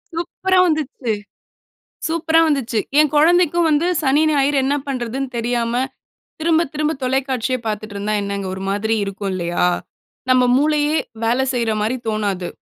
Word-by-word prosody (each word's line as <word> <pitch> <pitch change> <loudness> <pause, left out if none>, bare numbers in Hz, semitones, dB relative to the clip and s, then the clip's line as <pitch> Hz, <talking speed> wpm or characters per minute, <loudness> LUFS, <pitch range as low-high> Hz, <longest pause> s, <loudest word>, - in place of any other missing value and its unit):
சூப்பரா 370 +2 -1
வந்துச்சு! 295 -6 -2 1.0
சூப்பரா 325 0 +2
வந்துச்சு! 260 -7 0 0.2
என் 305 -2 +4
குழந்தைக்கும் 345 +2 +4
வந்து 310 +3 +2 0.2
சனி, 280 +2 +3
ஞாயிறு 285 -1 +2
என்ன 280 +2 +1
பண்றதுன்னு 260 0 -3
தெரியாம 235 0 -1 0.7
திரும்ப 325 0 +3
திரும்ப 305 +1 0
தொலைக்காட்சியே 260 -1 0
பாத்துட்டு 215 -1 -4
இருந்தா 205 +1 -2
என்னங்க, 200 -1 -3
ஒரு 190 - -6
மாதிரி 205 +3 0
இருக்கும் 195 0 -4
இல்லையா? 175 -1 0 0.6
நம்ம 255 0 +5
மூளையே, 300 +1 +2 0.3
வேல 235 +3 +1
செய்ற 235 -2 0
மாரி 220 +4 0
தோணாது. 205 -4 -1
260 Hz, 135 wpm, -20 LUFS, 215-305 Hz, 1.0 s, நம்ம